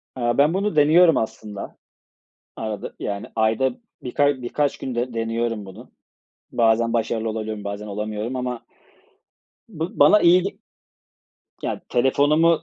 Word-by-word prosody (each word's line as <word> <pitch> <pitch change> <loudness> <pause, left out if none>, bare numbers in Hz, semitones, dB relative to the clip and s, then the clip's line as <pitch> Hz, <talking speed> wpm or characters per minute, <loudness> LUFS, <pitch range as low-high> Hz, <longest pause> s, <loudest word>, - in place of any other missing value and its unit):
Aaa, 120 -1 0
ben 150 +4 +4
bunu 200 -2 -1
deniyorum 160 +3 +6
aslında 105 -2 -5 0.8
arada. 110 -2 -5
Yani 100 0 -4
ayda 110 +4 +2 0.3
bir 125 - -6
ka 145 -3 +2
birkaç 145 +3 -1
günde 125 -1 -3
deniyorum 115 -1 -2
bunu. 100 +6 -12 0.6
Bazen 115 0 +2
başarılı 115 -1 -1
olabiliyorum, 110 -1 -4
bazen 100 +1 -5
olamıyorum 105 +4 -4
ama 125 -1 -3 1.1
Bu 175 +1 -6
bana 210 - +7
iyi 175 +1 +6
ge 195 - -5 1.0
Ya, - - -3
telefonumu 145 +6 +3
120 Hz, 125 wpm, -22 LUFS, 110-145 Hz, 1.1 s, bana